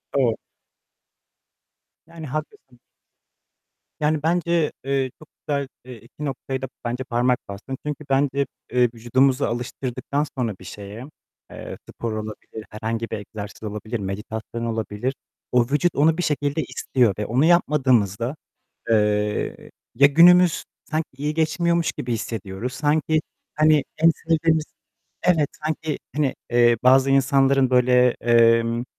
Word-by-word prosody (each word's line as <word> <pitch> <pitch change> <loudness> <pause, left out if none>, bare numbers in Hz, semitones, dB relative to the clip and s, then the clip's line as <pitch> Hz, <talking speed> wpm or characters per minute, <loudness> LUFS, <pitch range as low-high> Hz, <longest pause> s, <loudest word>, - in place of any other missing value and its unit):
Doğru. 125 -5 +3 1.7
Yani 165 -2 -9
haklısın. 135 -3 -7 1.2
Yani, 150 0 0
bence, 170 -1 +1
eee, 135 -2 -1
çok 155 - -15 0.2
güzel, 140 -2 -1 0.2
eee, 125 - -9
iki 120 +7 -10
noktaya 135 -1 -4
da 135 - -3 0.2
bence 125 +2 -2
parmak 125 0 +1
bastın. 105 +7 -7
Çünkü 150 0 -4
bence, 140 0 +2 0.3
eee, 125 0 +3
vücudumuzu 130 +4 +2
alıştırdıktan 130 +4 -3
sonra 115 -6 -1
bir 95 - -13
şeye, 105 +6 -8 0.5
eee, - - -8
spor 115 -2 -4
olabilir, 110 0 -7
herhangi 110 +2 -4
bir 110 - -3
egzersiz 105 +1 -9
olabilir, 110 +2 -4
meditasyon 110 +4 -5
olabilir, 115 +2 -2 0.4
o 125 -1 +4
vücut 150 +5 +1
onu 155 +3 +3
bir 180 - -1
şekilde 145 0 0
istiyor 125 -4 +1
ve 105 - -1
onu 130 +6 +2
yapmadığımızda, 130 - +2 0.6
eee, 105 -1 0 0.2
ya 140 - +7
günümüz 175 +3 +6 0.3
sanki 155 0 -1
iyi 150 +2 -2
geçmiyormuş 170 +1 +1
gibi 120 - -4
hissediyoruz. 110 +1 -4
Sanki, 155 +1 +1 0.3
hani, 155 -1 +4
en 165 +1 +6
sevdiğimiz 160 -1 +1 0.6
Evet 160 -5 +3 0.2
sanki, 155 -1 -2 0.2
hani, 145 -3 +1 0.2
eee, 120 0 +4
bazı 135 +1 +5
insanların 135 -1 +3
böyle, 125 0 +4
emm 115 0 +3
130 Hz, 125 wpm, -23 LUFS, 115-150 Hz, 1.7 s, ya